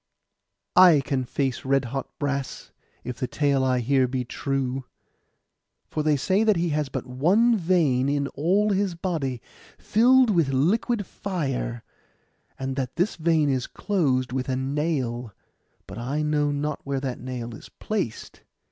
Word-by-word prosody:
'I 175 -6 +8
can 130 -1 -2
face 135 0 -2
red 135 -1 +1
hot 135 +2 -4
brass, 140 -3 -3 0.3
if 125 -1 -6
the 125 - -1
tale 140 -2 +1
I 130 -1 +2
hear 130 +1 +2
be 125 0 -2
true. 135 0 -2 1.1
For 155 - -1
they 150 -1 +2
say 190 - +2
that 215 -2 +4
he 170 0 0
has 150 -2 -1
but - - -4
one 180 - +3
vein 165 - +2
in 140 -1 0
all 195 +8 +1
his 195 -2 0
body, 155 -9 -3 0.3
filled 250 +2 +4
with 165 -7 +2
liquid 205 - +1
fire; 135 - -3 0.7
and 135 0 -3
that 130 -3 -3
this 180 +6 0
vein 160 -2 +2
is 130 -3 0
closed 135 -11 0
with 130 0 -2
a 130 - +1
nail: 130 -4 -2 0.5
but 100 +3 -8
I 140 +6 -2
know 150 -1 +1
not 145 +1 -2
where 140 -1 -2
that 130 -2 -4
nail 120 -2 -6
is - - -11
placed. 195 - -4
140 Hz, 155 wpm, -25 LUFS, 130-170 Hz, 1.1 s, I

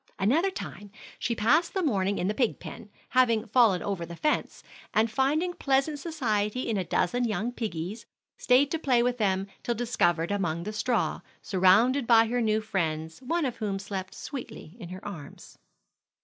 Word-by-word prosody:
Another 270 - +2
time, 205 - -8 0.3
she 235 - -1
passed 300 - +2
the 380 - 0
morning 200 - +1
in 180 - -1
the 210 - 0
pig 240 0 0
pen, 210 - -9 0.2
having 235 -3 +3
fallen 220 -5 +3
over 195 -4 -2
the 170 0 -7
fence; 300 - -1 0.3
and 220 +1 +3
finding 295 +9 +1
pleasant 275 0 0
society 250 -7 -1
in 225 - 0
a 190 - 0
dozen 185 +7 0
young 230 +1 -1
piggies, 210 -2 -5 0.3
stayed 265 +3 +3
to 325 - -1
play 250 -6 +3
with 245 0 0
them 195 -2 +1 0.2
till 240 - -1
discovered 175 -8 +1
among 170 -5 -1
the 210 - -5
straw, 230 +2 0 0.2
surrounded 220 +8 +4
by 230 -1 +6
her 240 +2 -1
new 215 -1 +1
friends, 160 -6 -2
one 330 +5 -1
of 250 - -3
whom 205 -3 -2
slept 195 -1 -6
sweetly 235 - -8
in 175 -5 -8
her 185 +1 -9
arms. 155 -8 -10
220 Hz, 175 wpm, -27 LUFS, 195-255 Hz, 0.3 s, by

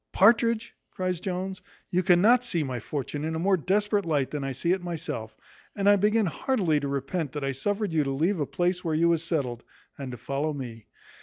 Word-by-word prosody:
"Partridge," 230 +2 +4 0.2
cries 185 -2 -2
Jones, 185 0 -4 0.3
"you 180 - +2
cannot 200 +7 +5
see 175 -10 0
my 130 -3 -3
fortune 145 +4 -4
in 160 +1 -2
a 165 +3 -2
more 195 -1 +5
desperate 205 +4 +1
light 150 -6 0
than 150 -2 -3
I 135 - -2
see 135 +7 -1
it 185 0 +1
myself; 155 -10 -5 0.4
and 200 -1 0
I 205 - +8
begin 210 +2 +3
heartily 180 - +1
to 140 - -3
repent 140 +2 -2
that 145 -2 -4
I 135 - 0
suffered 200 - -2
you 155 -2 +3
to - - -1
leave 165 +7 +1
a 145 - -1
place 180 +1 0
where 160 -3 0
you 170 +2 +3
was 165 -1 +2
settled, 135 -8 -2 0.4
and 135 -2 -5
to 125 - -7
follow 140 +6 -2
me. 120 -6 -7
170 Hz, 215 wpm, -27 LUFS, 140-195 Hz, 0.4 s, I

